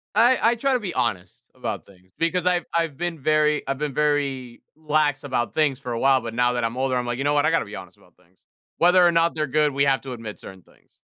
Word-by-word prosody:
I 245 +2 +5
I 230 +2 +4
try 275 +4 0
to 250 - +1
be 190 -4 -4
honest 100 -8 -3
about - - -5
things 95 -1 -22
because 170 +2 0
I've 175 -2 +2
I've 165 -4 0
been 175 0 -3
very 150 +1 +1
I've 135 - -2
been 150 -2 -3
very 140 -5 -1
lax 150 -2 0
about 120 -6 -2
things 150 -4 +1
for 125 -3 -6
a 115 - -3
while, 135 -1 +4
but 115 -2 -7
now 125 +1 +2
that 120 - -1
I'm 115 +2 -2
older, 130 0 0
I'm 125 -1 -1
like, 120 +1 -3
"You 135 - -2
know 145 - +2
what, 145 - +2
I - - +3
gotta 165 - +1
be 105 - -9
honest 90 -2 -11
about - - -25
things." - - -31 0.3
Whether 180 +1 +5
or 170 - +4
not 165 0 +2
they're 155 -1 -1
good, 150 +2 +1
we 140 +1 +1
have 135 -1 +2
to 130 -2 -7
admit 115 -3 -8
certain 95 -2 -12
things. - - -28
140 Hz, 265 wpm, -23 LUFS, 125-165 Hz, 0.3 s, I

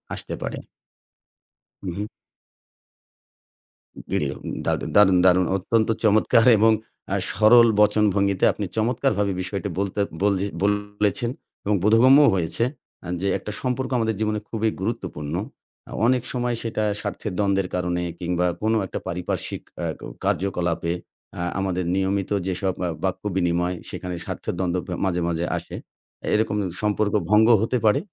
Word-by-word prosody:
আসতে - - -5
পারে। - - -4 1.3
হুম, 90 -3 -4
হুম। 105 - -2 2.1
দেরিও - - -1 0.3
দারু - - 0
দারুণ, 95 -3 +6
দারুণ 90 0 +5
অত্যন্ত 110 +4 +1 0.2
চমৎকার 110 +2 +4
এবং 110 +2 +5 0.4
অ্যা - - 0
সরল 115 +3 +6
বচন 105 0 +4
ভঙ্গিতে 100 -1 +1
আপনি 105 - -4
চমৎকারভাবে 110 -3 +1
বিষয়টি 100 +2 -4
বলতে 100 0 -2 0.2
বলজ 100 -2 +2 0.2
বলেছেন 105 +2 0 0.4
এবং 105 - +2
বোধগম্যও 130 +7 +6
হয়েছে 90 +5 -1 0.6
যে, 100 - 0
আ - - +1
একটা 105 - -6
সম্পর্ক 130 0 -1
আমাদের 110 -2 0
জীবনে 110 -1 0
খুবই 110 -1 0
গুরুত্বপূর্ণ। 90 -9 -4 0.6
আ - - -11
অনেক 125 +1 +3
সময় 120 -1 -1
সেটা 110 -2 -2 0.2
স্বার্থের 105 - -4
দ্বন্দ্বের 100 -2 +1
কারণে 90 -1 -1 0.2
কিংবা 90 0 0 0.2
কোন 110 +1 +1
একটা - - -5
পারিপার্শ্বিক 90 +1 -3 0.2
এহ 80 -1 -1
ক - - -22 0.2
কার্যকলাপে 85 -2 0 0.4
অ্যা 85 - -4 0.2
আমাদের 90 -2 -1
নিয়মিত 95 +1 0 0.2
যেসব 95 0 -1
অ্যা 90 - 0
বাক্য 95 +1 -2
বিনিময় 90 0 +1
সেখানে 90 -1 -5
স্বার্থের - - -4
দ্বন্দ্ব 90 -1 0
প - - -10 0.2
মাঝে, 90 -2 0
মাঝে 85 0 -1
আসে। - - -7 0.6
এরকম 105 -1 +1 0.3
সম্পর্ক 105 -1 0 0.2
ভঙ্গ 105 +1 +5
হতে 115 +3 +1
পারে। 110 +5 +4
100 Hz, 140 wpm, -23 LUFS, 90-110 Hz, 2.1 s, দারুণ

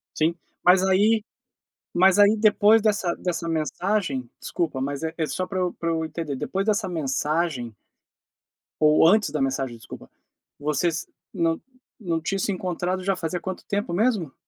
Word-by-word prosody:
Sim. 160 +2 +1 0.3
Mas 180 +1 +5
aí, 205 +3 +3 0.7
mas 190 +2 +5
aí 205 +1 +6
depois 215 0 +5
dessa 205 -5 +1
dessa 170 -2 -3
mensagem, 160 - -1
desculpa 155 -6 -2
mas 140 +2 -3
é 160 0 -3
é 160 -2 -1
só 185 +3 -3
pra 190 - -4
eu 180 -1 0
pra 165 0 -3
eu 160 -1 -1
entender, 160 -3 -4
depois 195 +9 -2
dessa 210 -2 +1
mensagem. 150 - -1 1.1
Ou 155 +1 +6
antes 210 -3 +4
da 150 - -3
mensagem, 135 -2 -1
desculpa, 115 - -11 0.5
vocês 150 +3 -1 0.3
não 165 -4 0 0.4
não 170 -6 -1
tinham 195 +5 -2
se 200 - 0
encontrado 185 0 -2
já 195 0 +1
fazia 175 0 -3
quanto 190 +1 -6
tempo 200 -4 -2
mesmo? 200 - +1
175 Hz, 160 wpm, -24 LUFS, 155-195 Hz, 1.1 s, aí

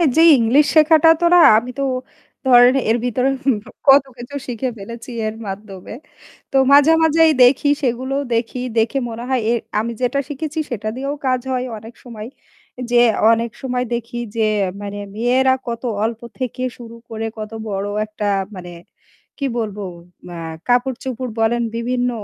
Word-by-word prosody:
যেই 330 +1 +7
ইংলিশ 245 +6 +4
শেখাটা 315 +1 +6
তো - - +3
না - - +7 0.2
আমি 240 +3 -2
তো - - 0 0.6
ধরেন 245 0 +6
এর 225 - +3
ভিতরে 250 +2 0 0.6
কত 275 0 +7
কিছু 245 +4 -9
শিখে 250 +1 -3
ফেলেছি 235 +5 -9 0.2
এর 215 - -4
মাধ্যমে। 195 0 -8 0.6
তো 270 - +2
মাঝে, 290 +2 +7
মাঝেই 320 0 +4
দেখি 270 +4 +4
সেগুলো 260 +1 -1 0.2
দেখি 230 +2 -2 0.2
দেখে 225 +5 +1
মনে 230 +1 -7
হয় 260 -2 +1
এ 235 - +3 0.3
আমি 230 +2 -2
যেটা 255 +2 0
শিখেছি 310 +2 -4
সেটা 215 -2 -4
দিয়েও 275 +2 -3
কাজ 255 -1 +2
হয় 255 -1 -1
অনেক 225 +2 -12
সময়। 225 -3 -8 0.6
যে 240 0 +5 0.3
অনেক 230 0 0
সময় 250 -1 -2
দেখি 235 +1 -4 0.2
যে 225 -1 +1 0.4
মানে 205 0 -6 0.2
মেয়েরা 255 +4 +2
কত 235 +1 -4 0.2
অল্প 225 0 -2 0.2
থেকে 255 0 -4
শুরু 230 -1 -11
করে 225 0 -4
কত 215 0 -6 0.2
বড় 200 -1 -3 0.2
একটা 210 0 -6 0.3
মানে 180 -1 -9 0.7
কি 280 - -3
বলবো 210 -2 -4 0.5
এ্যা 175 - -8 0.3
কাপড়-চোপড় 250 0 -1
বলেন 235 +2 +1
বিভিন্ন 245 +1 -1
245 Hz, 155 wpm, -19 LUFS, 225-265 Hz, 0.7 s, যেই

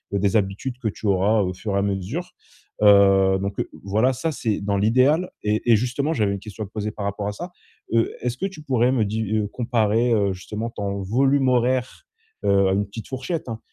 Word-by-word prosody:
heu, - - +1
des 100 +1 +1
habitudes 105 +5 -1
que 115 -4 -1
tu 105 +1 -6
auras 100 +3 +3
au 90 -2 -1
fur 105 +2 -4
et - - +2
à - - +1
mesure. 100 - -3 0.5
Heu, 100 -2 +6
donc, 100 0 -4
heu, - - -2
voilà, 110 +7 +2
ça, 145 +6 -2
c'est 110 -8 -2
dans 100 0 0
l'idéal. 130 - +3
Et 105 +3 +1
et - - +8
justement, 125 +7 -1
j'avais 105 -8 +1
une 100 - -4
question 105 +1 -7
à - - -11
te - - -23
poser 105 -1 -3
par 105 -1 -6
rapport 100 0 -3
à 105 - -1
ça: 175 - -7 0.4
heu, 115 0 +2
est-ce 125 0 -2
que 190 - -2
tu 195 -5 -11
pourrais 125 -4 +2
me 115 -5 +2
di 110 +2 -2
heu, 105 -1 0
comparer, 115 0 +1
heu, 100 -3 +2
justement 105 +5 -5
ton 100 -2 -4
volume 135 +7 +2
horaire 125 0 0 0.4
heu 100 -1 +4
à - - +2
une 100 +1 +1
petite 105 +2 -9
fourchette, 135 +3 -4
hein, 110 -1 -5
110 Hz, 225 wpm, -23 LUFS, 100-125 Hz, 0.5 s, et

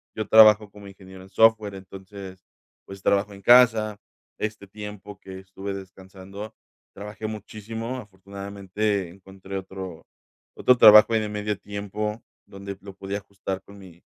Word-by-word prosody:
Yo 110 - -4
trabajo 110 -1 +7
como 100 -1 -13
ingeniero 95 -1 -13
en 95 - -16
software, 110 -1 +3
entonces, 95 0 -11 0.4
pues, 95 0 -11
trabajo 100 +1 +1
en 100 - -13
casa. 110 -3 +5 0.4
Este 105 -1 -4
tiempo 105 0 -10
que 95 -1 -10
estuve 95 +1 -7
descansando 95 +2 -10 0.4
trabajé 105 +1 -7
muchísimo. 110 +3 -6
Afortunadamente 100 -1 -4
encontré 95 +1 -9
otro 95 -2 -8 0.5
otro 125 - +4
trabajo 105 +1 +8
ahí 110 - +3
de 105 - -4
medio 105 0 -3
tiempo, 105 +2 -5 0.3
donde 100 0 -8
lo 100 -1 -10
podía 95 +1 -5
ajustar 95 -1 -6
con 100 0 -15
mi 90 -3 -15
100 Hz, 140 wpm, -24 LUFS, 95-105 Hz, 0.5 s, trabajo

